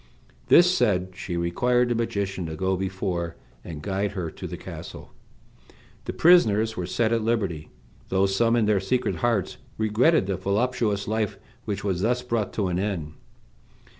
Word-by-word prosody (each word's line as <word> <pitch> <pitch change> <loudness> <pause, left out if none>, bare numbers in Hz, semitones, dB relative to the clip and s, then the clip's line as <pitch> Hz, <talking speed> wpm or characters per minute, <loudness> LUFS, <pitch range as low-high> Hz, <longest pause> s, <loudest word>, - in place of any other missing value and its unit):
This 180 +1 +6
said, 95 - +1
she 90 -1 -5
required 120 +9 +1
the - - +2
magician 100 -6 -2
to 80 - -5
go 95 +3 0
before, 90 -3 -3 0.3
and 75 -3 -8
guide 100 +2 -1
her 90 -5 -4
to - - -7
the - - -6
castle. - - -9 0.9
The - - -3
prisoners 110 - +4
were 90 -3 -3
set 110 +5 +1
at 115 - +1
liberty, 100 -9 -1 0.4
though 95 +1 +2
some, 115 +4 +2
in 115 -2 +3
their 105 -2 +3
secret 125 +6 -1
hearts, 115 -6 0 0.2
regretted 110 - +3
the 95 -1 -2
voluptuous 105 +1 0
life 110 -1 -1 0.3
which 105 -2 -3
was 95 -3 -1
thus 125 +4 +1
brought 115 -4 -1
to 100 -3 0
an 90 0 -1
end. 90 -7 -3
100 Hz, 165 wpm, -25 LUFS, 95-115 Hz, 0.9 s, This